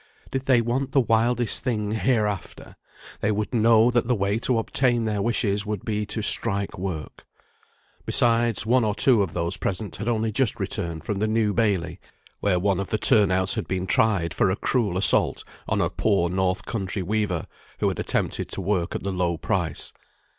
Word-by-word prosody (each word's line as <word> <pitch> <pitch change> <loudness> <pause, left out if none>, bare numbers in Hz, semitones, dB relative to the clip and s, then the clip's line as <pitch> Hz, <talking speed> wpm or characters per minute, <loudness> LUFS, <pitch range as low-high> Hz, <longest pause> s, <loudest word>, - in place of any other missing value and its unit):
Did 135 0 -3
they 125 -3 +5
want 130 +4 -2
the 140 - +5
wildest 120 0 +1
thing 105 -5 -1
heareafter, 105 -2 -2 0.5
they 110 - 0
would 105 +2 -2
know 115 +1 +4
that 120 -1 +1
the 125 - +2
way 100 +1 0
to 125 0 0
obtain 120 +1 0
their 105 -2 -1
wishes 105 -3 0
would 105 -2 -5
be 105 -1 -2
to 110 +1 -3
strike 100 -2 0
work. 90 -4 -6 0.8
Besides, 115 -2 +2
one 125 +2 +3
or 105 -2 0
two 120 -1 +4
of 95 -5 -2
those 85 +1 -1
present 100 +2 -3
had 105 - -5
only 110 -2 0
just 120 +1 0
returned 85 -2 -3
from 100 +3 -3
the 110 - +1
New 110 -1 +1
Bailey, 95 -6 0 0.4
where 100 -3 +1
one 95 0 +1
of 100 - -4
the 110 - 0
turn 105 -1 +5
outs 95 0 +1
had - - -3
been 95 -1 -2
tried 95 -4 +1
for - - +2
a 95 - +1
cruel 105 -6 -1
assault 95 - +3 0.3
on - - +1
a - - +1
poor 95 -5 +1
north 95 0 -1
country 95 -3 -3
weaver, 100 -3 -1 0.3
who - - 0
had - - -2
attempted - - -1
to - - -5
work 95 -2 -1
at - - -4
the 100 0 -2
low 90 -2 -1
price. 85 -2 -2
105 Hz, 190 wpm, -24 LUFS, 95-115 Hz, 0.8 s, they